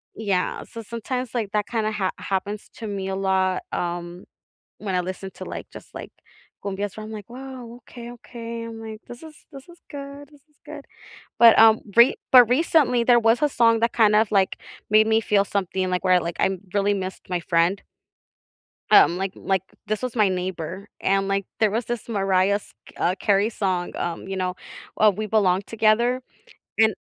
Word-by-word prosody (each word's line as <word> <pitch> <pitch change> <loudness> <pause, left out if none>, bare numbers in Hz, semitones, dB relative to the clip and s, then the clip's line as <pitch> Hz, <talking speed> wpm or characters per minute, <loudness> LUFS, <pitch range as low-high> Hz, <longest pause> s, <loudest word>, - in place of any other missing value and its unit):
Yeah. 195 -4 -1
So, 230 - -9
sometimes, 235 +2 -5
like, 215 -4 -2
that 210 -1 0
kinda 220 -2 -1
hap 195 -3 -2
happens 200 +2 -3
to 220 - -5
me 195 -2 -4
a 190 - -2
lot, 190 -1 +1
um, 175 +1 -4 0.5
when 195 -3 -4
I 180 - +2
listen 185 +1 -6
to, - - -8
like, - - -7
just, - - -13
like, - - -8 0.5
cumbias 200 0 -4
where 215 - -6
I'm 220 - -9
like, 210 0 -9
"Whoa. 255 -2 -9
Okay, 240 0 -11
okay." 230 -1 -8
I'm 225 -1 -8
like, 220 0 -8
"This 240 +3 -10
is 315 -2 -12 0.2
this 275 +1 -12
is 345 0 -16
good. 280 0 -9
This 290 -2 -20
is 300 - -35
good." - - -9 0.5
But, 230 -1 +8
um, 220 0 +7 0.2
re 235 +3 +6 0.2
but 245 -3 +8
recently, 255 -4 +3
there 240 -1 +5
was 225 +3 +3
a 295 - +4
song 230 -3 +3
that 230 - +1
kind 215 -2 +4
of, 215 -1 +3
like, 195 -2 +2 0.3
made 215 0 +5
me 220 0 +3
feel 205 -2 +2
something, 190 -2 -2
like, 180 0 -1
where, 185 -1 +5
like, 170 +1 -4
I 190 -1 +1 0.2
really 205 0 +2
missed 190 -1 -6
my 180 - 0
friend 170 +3 +1 1.1
um, 175 - +6
like 195 0 -2
like, 190 -1 -1 0.2
this 215 +2 -2
was 250 -1 -4
my 210 -2 +4
neighbor, 185 +1 -4
and, 195 0 +1
like, 195 0 0 0.2
there 215 -2 +4
was 230 +2 -1
this 240 +1 -5
Mariah 195 -2 +2
s 205 - -5 0.2
uh, 180 - +1
Carey 205 +2 +2
song, 185 -5 -2
um, 175 +1 -4
you 195 - -4
know, 185 -1 -2 0.4
uh, 215 -1 +5
"We 215 +2 -4
Belong 195 -3 +2
Together" 230 +3 +2 0.6
and 220 -1 +4
210 Hz, 195 wpm, -23 LUFS, 190-235 Hz, 1.1 s, But